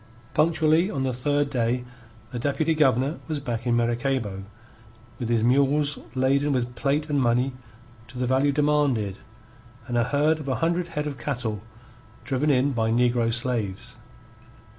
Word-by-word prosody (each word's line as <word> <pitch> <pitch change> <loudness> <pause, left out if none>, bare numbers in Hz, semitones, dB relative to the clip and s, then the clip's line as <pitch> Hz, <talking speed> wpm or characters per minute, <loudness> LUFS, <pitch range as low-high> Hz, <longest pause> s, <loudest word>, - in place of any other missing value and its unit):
Punctually 160 +2 +3
on 135 -9 -2
the 130 -1 -1
third 145 +3 0
day 125 0 0 0.5
the 125 - -4
Deputy 150 +5 0
Governor 140 -1 +2
was 155 -3 -2
back 120 -3 -4
in 120 - +3
Maracaybo 120 -4 -1 0.7
with 120 -3 -3
his 115 -2 +2
mules 140 +4 +2 0.2
laden 140 +2 +2
with 125 -1 -1
plate 145 +4 0
and 145 -2 +1
money 125 +2 +2 0.5
to 125 - -12
the 125 - 0
value 135 +3 +2
demanded 140 -9 +1 0.7
and 120 -1 -1
a 115 - +2
herd 150 +4 +2
of 150 - -8
a 130 - 0
hundred 170 +1 0
head 150 -3 -3
of 145 -3 -5
cattle 115 -7 -3 0.6
driven 135 +4 0
in 135 0 +3
by 115 -3 0
negro 120 0 +2
slaves. 120 -2 -2
130 Hz, 155 wpm, -25 LUFS, 120-145 Hz, 0.7 s, Punctually